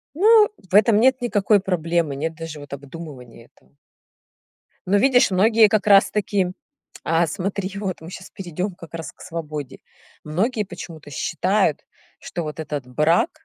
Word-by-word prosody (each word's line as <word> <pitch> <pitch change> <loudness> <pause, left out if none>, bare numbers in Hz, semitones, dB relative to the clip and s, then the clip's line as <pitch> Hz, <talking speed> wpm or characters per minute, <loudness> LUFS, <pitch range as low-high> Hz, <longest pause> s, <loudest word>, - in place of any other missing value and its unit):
ну, 425 +3 +6 0.2
в - - 0
этом 210 +1 +5
нет 260 +1 +3
никакой 210 -3 +2
проблемы, 170 -5 -1
нет 160 +3 -3
даже 165 -2 -7
вот 145 -1 -12
обдумывания 140 -5 -10
этого. 65 +2 -31 1.1
Но 200 +3 +3
видишь, 250 -2 +4
многие 215 +3 +5
как 210 0 0
раз-таки 200 -1 +3 0.6
а 165 +1 +2
смотри, 190 +2 -3
вот 190 -5 -4
мы 165 - -9
сейчас 185 - -10
перейдём 180 +1 -5
как 170 -1 -13
раз 165 -1 -6
к - - -20
свободе. 155 -4 -6 0.5
Многие 210 +9 0
почему-то 160 -5 -10
считают, 185 +3 0 0.3
что 170 - -5
вот 155 +1 -6
этот 145 -4 -4
брак 155 - +2
175 Hz, 145 wpm, -22 LUFS, 155-205 Hz, 1.1 s, ну